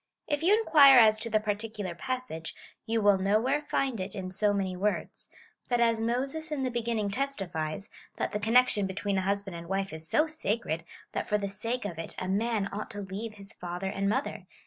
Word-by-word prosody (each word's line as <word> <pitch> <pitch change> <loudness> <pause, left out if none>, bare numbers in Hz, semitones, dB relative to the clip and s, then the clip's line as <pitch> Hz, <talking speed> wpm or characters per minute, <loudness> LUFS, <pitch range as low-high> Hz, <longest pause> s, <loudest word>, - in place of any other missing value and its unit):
If 295 -1 0
you 375 +6 +5
inquire 285 - +7
as 215 -2 +7
to 230 - -4
the 215 -1 +3
particular 210 -2 -3
passage, 250 -6 -5 0.3
you 225 -1 +1
will 205 -2 +5
nowhere 220 +9 +2
find 270 -5 -1
it 190 +1 -5
in 185 -1 -5
so 205 +2 +2
many 195 -2 -1
words; 205 +3 -2 0.4
but 245 -1 +2
as 230 -1 +3
Moses 270 +7 -1
in 285 -3 -1
the 255 - 0
beginning 230 -3 -1
testifies, 195 - -3 0.3
that - - -1
the 210 - -2
con 220 +3 -1
nection 230 -6 +5
between 195 +1 -1
a - - 0
husband 200 -1 -2
and 170 0 -8
wife 195 -2 -1
is 160 0 -7
so 305 - +4
sacred, 215 - -2 0.3
that - - -3
for 210 - +2
the 200 -1 -2
sake 225 +5 -3
of 170 -5 -5
it 165 - -6
a 185 - -3
man 210 +1 0
ought 210 +1 -4
to 205 - -6
leave 205 +3 -6
his 200 +1 -11
father 180 +2 -4
and 195 0 0
mother. 265 +6 -2
210 Hz, 210 wpm, -29 LUFS, 195-240 Hz, 0.4 s, inquire